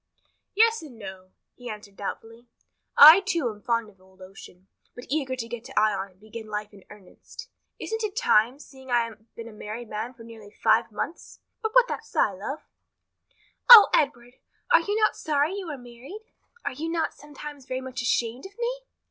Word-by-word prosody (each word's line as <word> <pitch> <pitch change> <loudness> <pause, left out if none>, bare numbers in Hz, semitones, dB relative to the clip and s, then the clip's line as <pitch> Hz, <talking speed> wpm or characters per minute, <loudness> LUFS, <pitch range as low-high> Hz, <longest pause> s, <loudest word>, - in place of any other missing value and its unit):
"Yes 455 0 +4
and 285 -7 -12
no," 190 -3 -10 0.2
he 245 -1 -10
answered, 210 -2 -9
doubtfully. 225 +4 -8 0.5
"I, 310 +5 +11
too, 345 -9 -1
am 210 -1 -14
fond 230 -1 -1
of 195 -3 -20
old 190 0 -24
ocean, 185 0 -14 0.3
but 245 - -10
eager 275 -4 -1
to 230 -3 -6
get 235 -1 -7
to - - -1
Ion 200 -2 0
and 185 0 -28
begin 215 +1 -10
life 210 0 -5
in 195 -2 -16
earnest. 210 - -14 0.3
Isn't 445 0 -4
it 420 -2 -3
time, 240 - +3
seeing 265 -3 -15
I 240 -1 +3
have 220 0 -14
been 230 0 -8
a 230 - -11
married 215 +2 -8
man 225 +4 -5
for 230 - -14
nearly 225 -2 -13
five 220 +2 +1
months? 270 +10 -6 0.2
But 440 -1 -3
why - - +8
that - - -5
sigh, - - 0
love?" 210 +11 -6 1.1
"O 460 -4 +12
Edward, 245 -4 0 0.3
are - - +6
you 410 +5 -2
not 430 - +2
sorry 300 +2 0
you 395 -2 -6
are 295 - -5
married? 250 - -11 0.4
Are - - -2
you 315 +5 -5
not 330 -1 -1
sometimes 295 -2 -11
very 255 - -3
much 260 0 -6
ashamed 235 +5 -1
of 400 - -23
me?" 485 +1 -2
240 Hz, 190 wpm, -25 LUFS, 215-310 Hz, 1.1 s, O